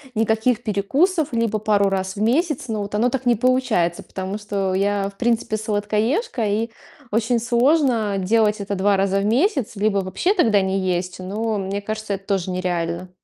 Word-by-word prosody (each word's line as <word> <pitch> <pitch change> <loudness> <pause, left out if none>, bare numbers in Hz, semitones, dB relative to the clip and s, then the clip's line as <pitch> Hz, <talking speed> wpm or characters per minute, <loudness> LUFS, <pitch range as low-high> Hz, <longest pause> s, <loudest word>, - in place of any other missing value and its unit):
никаких 220 +2 +1
перекусов 275 - +1
либо 230 -2 0
пару 205 -2 +2
раз 190 -1 -2
в 205 - -5
месяц, 265 +3 +1
но 220 -1 -2
вот 205 +1 -5
оно 235 +4 +2
так 260 +1 -3
не 240 -1 +4
получается, 245 -8 +1
потому 190 +2 -5
что 200 -2 -2
я, 200 +1 0
в 200 - -19
принципе, 230 -2 0
сладкоежка, 220 - -1
и 215 +3 0 0.4
очень 230 +2 +1
сложно 240 -3 +2
делать 210 +2 +2
это 200 0 -3
2 200 +1 +2
раза 195 0 +1
в 200 - -1
месяц, 265 - +1
либо 205 0 +1
вообще 190 - 0
тогда 225 - +3
не 190 0 0
есть, 180 -1 -2
но 210 +4 -2
мне 195 +1 -3
кажется, 215 0 -4
это 195 0 -6
тоже 190 -2 -1
нереально. 180 -1 -2
210 Hz, 175 wpm, -21 LUFS, 195-235 Hz, 0.4 s, не